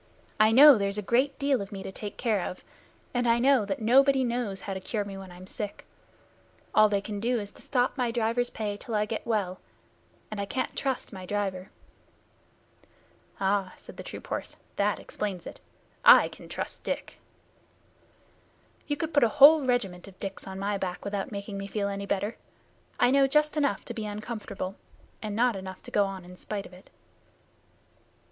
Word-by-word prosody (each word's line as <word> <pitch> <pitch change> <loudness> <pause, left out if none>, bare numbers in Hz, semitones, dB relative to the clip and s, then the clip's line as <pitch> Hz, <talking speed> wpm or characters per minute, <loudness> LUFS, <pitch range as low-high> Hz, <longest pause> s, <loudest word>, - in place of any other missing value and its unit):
I 215 +1 +6
know 275 0 +9
there's 200 0 -1
a 210 - -2
great 260 +7 +2
deal 280 -4 +1
of 200 +1 -7
me 195 -2 -6
to - - -6
take 205 +1 -7
care 220 -5 +1
of, 180 - -10 0.5
and 245 -1 +1
I 230 0 +4
know 255 -2 +4
that 200 +2 -3
nobody 265 +3 +5
knows 235 -5 -2
how 195 - -4
to 190 - -4
cure 210 +2 -2
me 200 -1 -7
when 190 -1 -9
I'm 180 +1 -11
sick. 205 +1 -6 0.9
All 215 0 +6
they 200 -1 +1
can 205 0 -5
do 240 +2 +1
is 205 -1 -6
to - - -15
stop 250 -2 0
my 245 -1 +1
driver's 235 +1 0
pay 210 -2 -4
till 225 +1 -5
I 210 0 +2
get 220 +2 -5
well, 200 -5 -1 0.7
and 210 -1 -3
I - - -2
can't 255 +6 -3
trust 265 -4 -2
my 185 -2 -8
driver." 195 -2 -2 1.7
"Ah!" 195 -1 +1
said - - -12
the - - -6
troop - - -8
horse. - - -4 0.2
"That 200 -1 +1
explains 190 -4 -4
it. - - -9 0.4
I - - +8
can - - -13
trust - - -3
Dick." - - -4 1.7
"You 290 - -1
could 320 +1 -3
put 285 - +5
a 235 - +5
whole 290 +5 +8
regiment 200 -8 -1
of 190 -1 -14
Dicks 195 -1 -5
on 190 0 -6
my 200 +1 -1
back 185 0 -4
without 200 0 -3
making 200 -1 -5
me 195 - -5
feel 200 0 -2
any 200 0 -4
better. 200 +3 -1 0.6
I 245 0 +5
know 275 0 +5
just 300 +2 +2
enough 290 -2 0
to - - -5
be 220 -3 -4
uncomfortable, 205 -3 -5 0.4
and 210 -2 -4
not 240 0 +3
enough 190 -1 -8
to - - -9
go 205 - +3
on 190 -2 -6
in 180 0 -12
spite 200 0 -5
of - - -13
it." 180 +1 -16
210 Hz, 195 wpm, -28 LUFS, 195-245 Hz, 1.7 s, know